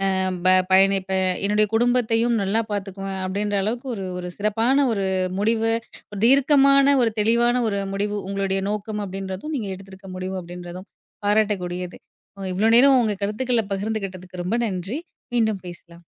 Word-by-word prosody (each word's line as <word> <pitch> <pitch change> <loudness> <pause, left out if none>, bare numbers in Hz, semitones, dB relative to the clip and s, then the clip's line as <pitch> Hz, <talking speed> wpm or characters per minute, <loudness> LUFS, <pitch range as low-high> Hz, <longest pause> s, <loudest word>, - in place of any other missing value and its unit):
அ - - 0 0.3
ப - - +6 0.2
பயணிப்பேன். 190 0 +3 0.2
என்னுடைய 210 +1 +3
குடும்பத்தையும் 235 0 +2
நல்லா 200 +3 +1
பார்த்துக்குவேன்." 195 -1 -4
அப்படீன்ற 205 +2 -2
அளவுக்கு 235 +5 -3
ஒரு, 195 -2 -5
ஒரு 180 - -5
சிறப்பான 225 +7 +2
ஒரு 200 -3 -1 0.3
முடிவு, 225 +2 +1 0.4
ஒரு 205 - -6
தீர்க்கமான 275 +1 +5
ஒரு 230 -2 +2
தெளிவான 235 +3 +2
ஒரு 200 -1 -2
முடிவு 205 +1 -2
உங்களுடைய 195 -1 -1
நோக்கம் 210 0 -3
அப்படீன்றதும், 195 +8 -6
நீங்க 220 -7 -3
எடுத்திருக்க 190 0 -13
முடிவு 185 +1 -4
அப்படீன்றதும் 175 +2 -9 0.4
பாராட்டக்கூடியது. 185 -4 0 0.4
அ 195 - -6
இவ்வளோ 210 +5 +2
நேரம் 270 +1 +6
உங்க 215 -3 0
கருத்துக்கள 230 +3 0
பகிர்ந்துகிட்டதுக்கு 195 -3 -4
ரொம்ப 185 +7 -1
நன்றி. 195 - -4 0.4
மீண்டும் 220 -4 +1
பேசலாம். 175 -1 -13
205 Hz, 140 wpm, -23 LUFS, 190-225 Hz, 0.4 s, ப